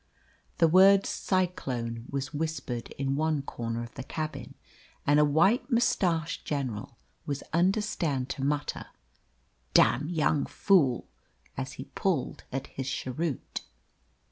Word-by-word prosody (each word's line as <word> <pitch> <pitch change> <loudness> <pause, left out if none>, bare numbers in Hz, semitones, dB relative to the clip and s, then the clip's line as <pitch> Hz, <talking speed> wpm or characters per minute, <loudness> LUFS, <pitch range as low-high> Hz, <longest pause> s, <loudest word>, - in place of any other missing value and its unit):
The 165 - +5
word 190 +4 +7
"cyclone" 125 - -1
was 135 -1 -3
whispered 145 -6 -3
in 135 0 -1
one 155 -1 0
corner 115 -3 -4
of 120 - -10
the - - -6
cabin, 155 +3 -5 0.5
and 145 +1 +5
a - - +6
white 165 - +3
moustached 180 - +1
general 125 -6 -3 0.3
was 140 -1 -3
understood 175 - +1
to 135 - -4
mutter 145 +1 -1 0.9
"Damned 145 +6 +5
young 155 -3 +1
fool!" 150 - +3 0.5
as - - -4
he - - -7
pulled - - -1
at 135 +1 -3
his 135 0 -5
cheroot. 135 +3 -3
145 Hz, 120 wpm, -29 LUFS, 130-170 Hz, 0.9 s, word